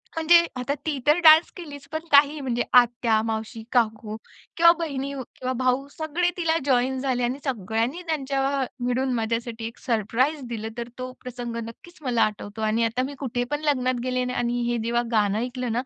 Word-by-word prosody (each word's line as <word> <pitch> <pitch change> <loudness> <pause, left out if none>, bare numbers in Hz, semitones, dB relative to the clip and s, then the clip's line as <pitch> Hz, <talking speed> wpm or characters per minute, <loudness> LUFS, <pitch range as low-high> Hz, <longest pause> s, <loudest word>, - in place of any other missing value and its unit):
म्हणजे 335 +1 +6 0.2
आता 250 +3 -1
ती 300 -4 -1
तर 300 +4 +5
डान्स 315 +1 +8
केलीच, 290 -5 -9
पण 315 - -2
काही 290 +1 +5
म्हणजे 245 -3 -1
आत्या, 240 -2 +4
मावशी, 220 0 -4
काकू 220 -3 0 0.4
किंवा 335 0 +8
बहिणी 280 -4 -3 0.2
किंवा 255 0 -3
भाऊ, 255 +2 +1
सगळे 320 +2 0
तिला 330 -2 +1
जॉइन 260 -1 +2
झाले 255 -2 -1
आणि 250 +3 -1
सगळ्यांनी 230 - -1
त्यांच्या 275 -2 0 0.2
मिळून 255 +1 0
माझ्यासाठी 230 0 -2
एक 230 - -10
सरप्राईज 250 +5 0
दिलं. 220 -2 -4
तर 235 0 -5
तो 255 0 -5
प्रसंग 245 -2 -6
नक्कीच 345 +9 -15
मला 245 -4 +2
आठवतो. 210 0 -4
आणि 220 +1 +1
आता 230 +3 -1
मी 285 - -8
कुठेपण 250 +4 -2
लग्नात 255 -4 +1
गेले 255 0 -1
ना 250 - -3
आणि 240 0 -1
हे 240 - 0
जेव्हा 235 +1 +1
गाणं 210 -2 +2
ऐकलं 250 0 -3
ना, 235 +2 0
250 Hz, 180 wpm, -24 LUFS, 230-280 Hz, 0.4 s, डान्स